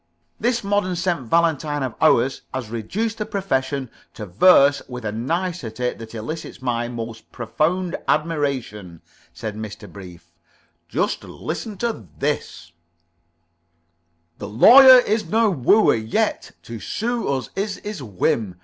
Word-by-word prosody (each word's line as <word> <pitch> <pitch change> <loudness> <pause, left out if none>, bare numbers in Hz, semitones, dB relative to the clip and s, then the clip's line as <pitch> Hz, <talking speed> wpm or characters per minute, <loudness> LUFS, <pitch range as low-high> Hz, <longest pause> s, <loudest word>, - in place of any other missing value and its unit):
"This 235 0 0
modern 200 -2 0
St. 170 -7 -2
Valentine 150 -1 +1
of 130 -3 -3
ours 125 +3 +3
has 120 -5 -5
reduced 210 - -3
the 210 - -2
profession 135 - -2 0.2
to 105 - -6
verse 140 - +5
with 125 -3 -8
a 105 - -1
nicety 125 - -3
that 115 0 -11
elicits 120 +9 -6
my 120 -2 -2
most 115 -1 -8
profound 170 +9 -1
admiration," 135 - -2 0.3
said 110 -2 -6
Mr. 105 0 -8
Brief. 90 -4 -13 0.6
"Just - - -1
listen 215 -3 -6
to 225 - -3
this: 85 +1 -3 1.7
"The - - -6
Lawyer 255 - +9
is 215 -1 -1
no 220 -1 +3
wooer, 185 - +4
yet 110 0 -1
To 115 -1 -8
sue 235 - -3
us 130 -3 -2
is 200 +1 -2
his 205 -5 -6
whim. 105 -2 -1
135 Hz, 130 wpm, -22 LUFS, 115-185 Hz, 1.7 s, Lawyer